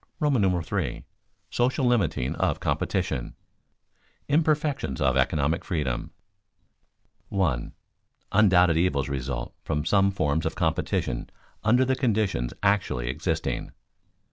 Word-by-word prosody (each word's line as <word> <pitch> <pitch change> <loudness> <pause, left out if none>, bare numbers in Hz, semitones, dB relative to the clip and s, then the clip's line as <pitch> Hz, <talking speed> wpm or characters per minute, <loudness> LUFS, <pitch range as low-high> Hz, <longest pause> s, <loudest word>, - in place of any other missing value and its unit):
§ 100 - +1
III. 60 -8 -5 0.5
SOCIAL 130 +3 +1
LIMITING 95 - +1
OF - - 0
COMPETITION - - -1
[Sidenote: - - -8 0.9
Imperfections 150 - +1
of 65 - +2
economic 70 +4 +1
freedom] 75 -8 -2 1.2
1. 85 -12 0 0.6
_Undoubted 90 -5 +5
evils 70 -6 +1
result 65 -2 -3
from 75 -1 -2
some 100 +2 +4
forms 80 -4 0
of 80 - -4
competition 80 -4 -1 0.3
under 120 +4 +4
the 130 +1 +1
conditions 105 - 0
actually 100 -12 +1
existing. 80 +5 -2
85 Hz, 105 wpm, -26 LUFS, 70-105 Hz, 1.2 s, Undoubted